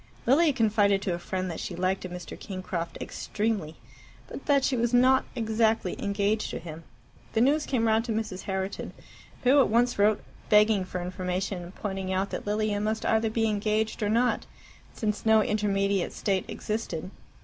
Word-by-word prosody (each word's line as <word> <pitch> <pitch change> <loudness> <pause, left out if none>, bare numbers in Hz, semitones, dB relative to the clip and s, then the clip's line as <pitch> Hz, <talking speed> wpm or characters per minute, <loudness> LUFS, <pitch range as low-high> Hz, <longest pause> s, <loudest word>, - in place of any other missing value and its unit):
Lilia 295 +6 +5
confided 210 -5 +3
to 185 - 0
a 170 - -3
friend 185 +1 -3
that 165 - -6
she 175 - -5
liked 185 +2 -1
a - - -5
Mr. 180 -1 -7
Kingcroft 185 -4 -5
extremely, 205 -8 -3 0.5
but - - -9
that 280 -2 +4
she 270 - +2
was 235 0 +1
not 260 +2 +5
exactly 220 -4 +1
engaged 205 +1 0
to - - -4
him. 165 -1 -8 0.5
The 225 - +2
news 295 +5 +3
came 240 -4 +1
round 220 +1 +2
to 235 - -3
Mrs. 215 -4 -3
Herriton, 190 0 -3 0.5
who 265 +3 +6
at 270 - +4
once 240 0 +2
wrote, 210 +1 +3 0.3
begging 210 -2 +5
for 180 -1 -4
information, 185 +1 -3
and 180 - -12
pointing 190 -2 -4
out 190 +1 -1
that - - -5
Lilia 210 0 0
must 220 +1 -1
either 220 0 +2
be 225 0 +1
engaged 215 +1 0
or 205 - +1
not, 240 +3 +1 0.4
since 210 -2 -2
no 220 -1 +5
intermediate 200 -2 0
state 195 -3 -1
existed. 190 -5 -4
210 Hz, 175 wpm, -27 LUFS, 190-225 Hz, 0.5 s, who